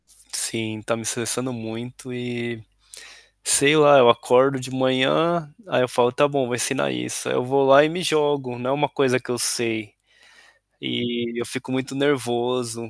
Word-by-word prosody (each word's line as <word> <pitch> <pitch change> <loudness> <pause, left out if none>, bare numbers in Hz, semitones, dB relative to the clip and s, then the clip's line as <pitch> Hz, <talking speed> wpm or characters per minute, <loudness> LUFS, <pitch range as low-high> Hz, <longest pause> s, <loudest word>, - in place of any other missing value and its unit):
Sim, 110 -1 -5
está 110 +2 -3
me 115 - -8
estressando 120 +3 -2
muito 115 +3 -9
e 120 -2 -6 0.8
sei 140 +2 +5
lá, 145 -2 +7
eu 120 -2 +7
acordo 130 +3 +3
de 130 0 -8
manhã, 135 +5 +1 0.2
aí - - +1
eu 125 - 0
falo: 120 0 +2
"Está 145 +4 +2
bom, 140 -1 -1
eu - - -2
vou 120 - -3
ensinar 70 - -1
isso.". - - -4
Aí - - -2
eu - - 0
vou 135 +2 +1
lá 135 +2 +7
e - - +1
me 175 +3 -4
jogo, 145 -5 0
não 125 +1 -3
é - - +1
uma 145 +1 0
coisa 130 -2 +1
que - - -11
eu 120 - -2
sei. 110 -3 -1 0.9
E, 120 -1 -3
eu 120 - -4
fico 130 +1 -7
muito 130 +1 -3
nervoso, 120 -4 -2
125 Hz, 185 wpm, -22 LUFS, 120-140 Hz, 0.9 s, lá